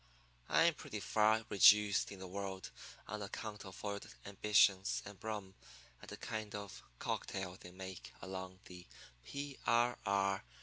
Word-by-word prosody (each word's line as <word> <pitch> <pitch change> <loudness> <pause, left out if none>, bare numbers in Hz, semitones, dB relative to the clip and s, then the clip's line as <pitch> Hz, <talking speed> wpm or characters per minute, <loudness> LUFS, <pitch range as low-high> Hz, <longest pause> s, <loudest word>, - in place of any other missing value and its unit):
I'm 165 +1 +5
pretty 110 -6 -6
far 110 +2 +3
reduced 105 0 +6
in 100 - -7
the 95 - -8
world 95 0 -5 0.4
on 105 -1 -4
account 105 +1 -6
of 95 - -9
foiled 100 -1 -4 0.2
ambitions 100 -1 +3
and 100 -1 -11
rum 105 -4 -4 0.5
and - - -10
a - - -6
kind 110 -1 -4
of 100 -1 -7 0.2
cocktail 95 +6 -3
they 90 - -10
make 95 0 -8
along 95 0 -6
the 90 -1 -11 0.4
P. 140 - -6
R. 120 +1 +3
R. 100 -1 +1
100 Hz, 145 wpm, -37 LUFS, 95-105 Hz, 0.5 s, reduced